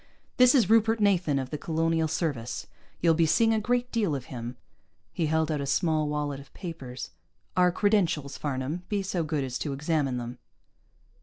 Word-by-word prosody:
"This 250 Hz, +1 st, +7 dB
is 235 Hz, -8 st, +4 dB
Rupert 225 Hz, +1 st, +4 dB
Nathan, 185 Hz, -8 st, +2 dB
of 130 Hz, -1 st, -3 dB
the 150 Hz, -, -3 dB
Colonial 165 Hz, 0 st, +1 dB
Service. 140 Hz, -7 st, -2 dB, 0.4 s
You'll 165 Hz, -1 st, +5 dB
be 165 Hz, 0 st, +3 dB
seeing 225 Hz, +7 st, +4 dB
a 220 Hz, -, +2 dB
great 245 Hz, +3 st, 0 dB
deal 205 Hz, -10 st, +1 dB
of 130 Hz, -2 st, -5 dB
him." 120 Hz, 0 st, -6 dB, 0.6 s
He 165 Hz, -, 0 dB
held 160 Hz, 0 st, +1 dB
out 150 Hz, -2 st, -1 dB
a 140 Hz, -, -3 dB
small 155 Hz, 0 st, +1 dB
wallet 145 Hz, -2 st, -2 dB
of 140 Hz, 0 st, -14 dB
papers. 135 Hz, -9 st, -7 dB, 0.4 s
"Our 180 Hz, -1 st, +4 dB
credentials, 175 Hz, -8 st, +1 dB
Farnam. 140 Hz, +4 st, -3 dB
Be 205 Hz, -2 st, 0 dB
so 185 Hz, -3 st, -1 dB
good 150 Hz, -2 st, -1 dB
as 130 Hz, -1 st, -4 dB
to 145 Hz, -, -2 dB
examine 145 Hz, -2 st, 0 dB
them." 120 Hz, 0 st, -6 dB
160 Hz, 180 wpm, -28 LUFS, 140-190 Hz, 0.6 s, This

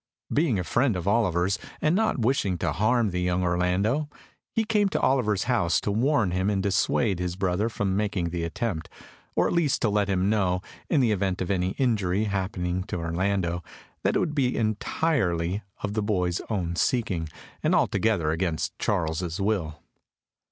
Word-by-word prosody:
Being 145 Hz, -, +2 dB
a 90 Hz, -, -1 dB
friend 120 Hz, -, +1 dB
of 90 Hz, 0 st, -4 dB
Oliver's, 95 Hz, -3 st, +2 dB, 0.2 s
and 155 Hz, +3 st, +2 dB
not 220 Hz, -3 st, +1 dB
wishing 115 Hz, -6 st, +1 dB
to -, -, -1 dB
harm 110 Hz, 0 st, +2 dB
the 90 Hz, 0 st, -1 dB
young 90 Hz, 0 st, +1 dB
Orlando, 90 Hz, +11 st, +1 dB, 0.4 s
he 225 Hz, -, +1 dB
came 210 Hz, -2 st, +2 dB
to -, -, -1 dB
Oliver's 110 Hz, -7 st, +2 dB
house 120 Hz, -9 st, +2 dB
to 105 Hz, -, -1 dB
warn 120 Hz, -2 st, +2 dB
him 95 Hz, +2 st, 0 dB
to 105 Hz, -, +1 dB
dissuade 100 Hz, +1 st, +1 dB
his 90 Hz, -1 st, -2 dB
brother 95 Hz, +3 st, 0 dB
from 100 Hz, -4 st, -1 dB
making 100 Hz, -5 st, -1 dB
the 85 Hz, -1 st, -2 dB
attempt, 85 Hz, 0 st, -3 dB, 0.5 s
or -, -, +3 dB
at -, -, -1 dB
least 170 Hz, -6 st, +2 dB
to 110 Hz, -, +3 dB
let 105 Hz, -1 st, +1 dB
him 95 Hz, 0 st, +1 dB
know, 95 Hz, -4 st, +1 dB, 0.3 s
in 150 Hz, -, +3 dB
the 120 Hz, -3 st, +3 dB
event 95 Hz, -2 st, 0 dB
of 95 Hz, +1 st, -2 dB
any 95 Hz, 0 st, 0 dB
injury 105 Hz, -6 st, +1 dB
happening 95 Hz, -3 st, -2 dB
to -, -, -4 dB
Orlando, 85 Hz, +1 st, -1 dB, 0.4 s
that -, -, +1 dB
it -, -, +3 dB
would 150 Hz, -, -1 dB
be 130 Hz, -4 st, +1 dB
entirely 105 Hz, -, 0 dB, 0.2 s
of 105 Hz, -, -2 dB
the 110 Hz, -, 0 dB
boy's 90 Hz, -4 st, 0 dB
own 90 Hz, -6 st, -1 dB
seeking, 95 Hz, -7 st, 0 dB, 0.3 s
and -, -, +2 dB
altogether 95 Hz, -9 st, +2 dB
against 80 Hz, -1 st, -2 dB
Charles's 80 Hz, +2 st, -1 dB
will. 95 Hz, -7 st, -1 dB
100 Hz, 175 wpm, -26 LUFS, 90-115 Hz, 0.5 s, or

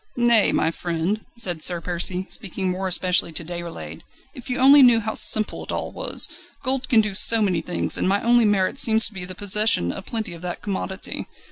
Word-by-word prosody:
"Nay, 235 Hz, -3 st, +3 dB
my 160 Hz, -, 0 dB
friend," 175 Hz, +5 st, -4 dB
said 175 Hz, -8 st, 0 dB
Sir 175 Hz, +1 st, +3 dB
Percy, 180 Hz, +2 st, -2 dB
speaking 190 Hz, -2 st, -2 dB
more 190 Hz, +1 st, -4 dB
especially 180 Hz, -1 st, 0 dB
to 160 Hz, +1 st, -4 dB
Déroulède; 170 Hz, 0 st, -8 dB, 0.3 s
"if 255 Hz, -5 st, -12 dB
you 250 Hz, -, -3 dB
only 275 Hz, +2 st, +6 dB
knew 240 Hz, -3 st, +5 dB
how 220 Hz, 0 st, -5 dB
simple 215 Hz, -1 st, +3 dB
it -, -, -8 dB
all -, -, -5 dB
was! -, -, -2 dB, 0.4 s
Gold 260 Hz, 0 st, -2 dB
can 225 Hz, -3 st, +4 dB
do 210 Hz, -2 st, -4 dB
so 225 Hz, +3 st, +4 dB
many 190 Hz, -6 st, 0 dB
things, 180 Hz, -, -1 dB
and -, -, 0 dB
my 200 Hz, +1 st, +1 dB
only 240 Hz, 0 st, +3 dB
merit 205 Hz, +4 st, 0 dB
seems 225 Hz, -3 st, +6 dB
to -, -, -5 dB
be 185 Hz, -2 st, -6 dB
the 185 Hz, 0 st, -8 dB
possession 205 Hz, -, +2 dB
of 190 Hz, -, -8 dB
plenty 220 Hz, -6 st, -4 dB
of 170 Hz, -, -12 dB
that 180 Hz, -1 st, -7 dB
commodity. 190 Hz, -1 st, -4 dB
195 Hz, 210 wpm, -21 LUFS, 180-225 Hz, 0.4 s, only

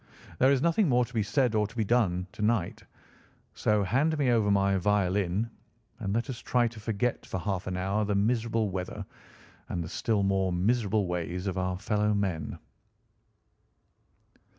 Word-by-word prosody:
There 130 Hz, +2 st, +5 dB
is 135 Hz, -2 st, +2 dB
nothing 170 Hz, +2 st, +3 dB
more 125 Hz, -1 st, +3 dB
to 125 Hz, -, -16 dB
be 110 Hz, -, +1 dB
said 125 Hz, +3 st, +1 dB
or 105 Hz, -1 st, +2 dB
to 115 Hz, -, -17 dB
be 115 Hz, -, +1 dB
done 95 Hz, -5 st, +1 dB
to 105 Hz, -, -9 dB
night, 105 Hz, -5 st, 0 dB, 0.7 s
so 105 Hz, -1 st, +1 dB
hand 140 Hz, -, +1 dB
me 135 Hz, -4 st, +2 dB
over 110 Hz, -3 st, +2 dB
my 100 Hz, -1 st, +3 dB
violin 100 Hz, +1 st, +1 dB, 0.5 s
and 100 Hz, -4 st, -3 dB
let 115 Hz, +5 st, 0 dB
us 130 Hz, -4 st, -5 dB
try 120 Hz, -1 st, +1 dB
to 115 Hz, -1 st, -12 dB
forget 110 Hz, +3 st, -1 dB
for 95 Hz, -, -4 dB
half 95 Hz, 0 st, -3 dB
an 90 Hz, 0 st, -2 dB
hour 100 Hz, +3 st, 0 dB
the 105 Hz, 0 st, 0 dB
miserable 115 Hz, 0 st, +1 dB
weather 90 Hz, -1 st, -4 dB, 0.6 s
and 85 Hz, -, -2 dB
the 80 Hz, -, -7 dB
still 105 Hz, 0 st, 0 dB
more 95 Hz, -1 st, +1 dB
miserable 105 Hz, +2 st, +1 dB
ways 90 Hz, +1 st, -3 dB
of 95 Hz, -2 st, -2 dB
our 95 Hz, 0 st, -1 dB
fellow 105 Hz, +1 st, 0 dB
men." 95 Hz, -7 st, -2 dB
105 Hz, 175 wpm, -28 LUFS, 95-115 Hz, 0.7 s, There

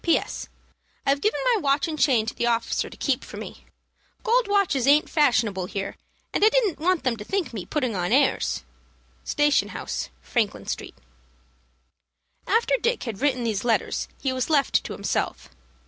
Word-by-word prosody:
"P.S. 335 Hz, -, 0 dB, 0.6 s
I've 280 Hz, +1 st, +2 dB
given 425 Hz, -, +1 dB
my 435 Hz, -, +1 dB
watch 280 Hz, +1 st, +2 dB
and 310 Hz, -2 st, -4 dB
chain 245 Hz, -7 st, +3 dB
to 225 Hz, -, -3 dB
the 240 Hz, -, -1 dB
officer 230 Hz, -1 st, 0 dB
to -, -, -13 dB
keep -, -, 0 dB
for -, -, -9 dB
me. -, -, -9 dB, 0.6 s
Gold -, -, +3 dB
watches 380 Hz, -11 st, +2 dB
aint 295 Hz, +2 st, +5 dB
fashionable 220 Hz, -, +2 dB
here, 195 Hz, 0 st, -4 dB, 0.4 s
and -, -, +1 dB
I 430 Hz, -, +8 dB
didn't 450 Hz, -7 st, +1 dB
want 360 Hz, +1 st, +1 dB
them 250 Hz, -4 st, 0 dB
to 210 Hz, -, -7 dB
think 350 Hz, -, -2 dB
me 200 Hz, -6 st, -6 dB
putting 255 Hz, -8 st, -1 dB
on 180 Hz, +1 st, -1 dB
airs. 270 Hz, +3 st, +2 dB, 0.6 s
"Station 295 Hz, -1 st, +2 dB
House, -, -, -4 dB
Franklin 205 Hz, -, -1 dB
Street." -, -, -5 dB, 1.5 s
After 460 Hz, +4 st, +3 dB
Dick 475 Hz, +1 st, 0 dB
had 230 Hz, -3 st, -5 dB
written 260 Hz, -4 st, +1 dB
these 215 Hz, -4 st, -1 dB
letters 235 Hz, -2 st, 0 dB
he 265 Hz, -2 st, -1 dB
was 255 Hz, +2 st, -2 dB
left 285 Hz, -3 st, +3 dB
to -, -, -5 dB
himself. -, -, -2 dB
275 Hz, 170 wpm, -25 LUFS, 230-340 Hz, 1.5 s, I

